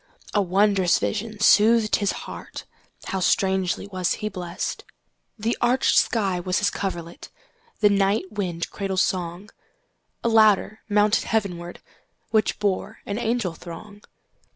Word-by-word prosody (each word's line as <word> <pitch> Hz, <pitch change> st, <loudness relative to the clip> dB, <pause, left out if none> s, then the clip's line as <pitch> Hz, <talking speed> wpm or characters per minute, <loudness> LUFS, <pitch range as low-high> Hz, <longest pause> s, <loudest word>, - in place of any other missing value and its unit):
A 205 Hz, -, +3 dB
wondrous 195 Hz, -1 st, +3 dB
vision 215 Hz, 0 st, -3 dB
soothed 215 Hz, +1 st, +5 dB
his 200 Hz, -2 st, 0 dB
heartHow 190 Hz, -, -8 dB
strangely 190 Hz, 0 st, +1 dB
was 185 Hz, -3 st, -1 dB
he 215 Hz, -, -4 dB
blessed! 180 Hz, -3 st, -5 dB, 0.5 s
The 225 Hz, +2 st, -1 dB
arched 245 Hz, +2 st, +3 dB
sky 195 Hz, -6 st, +2 dB
was 180 Hz, +1 st, -1 dB
his 205 Hz, -, +1 dB
coverlet, 175 Hz, -4 st, -5 dB, 0.5 s
The 210 Hz, -, +6 dB
night 195 Hz, 0 st, +1 dB
wind 180 Hz, -5 st, -3 dB
cradle 195 Hz, -2 st, -3 dB
song;A 190 Hz, -, -5 dB
ladder 215 Hz, -1 st, +4 dB
mounted 210 Hz, +1 st, +3 dB
heavenwardWhich 200 Hz, +2 st, -3 dB
bore 200 Hz, -3 st, -2 dB
an 200 Hz, +3 st, -3 dB
angel 230 Hz, -6 st, -1 dB
throng. 205 Hz, +5 st, -11 dB
200 Hz, 115 wpm, -24 LUFS, 185-215 Hz, 0.5 s, The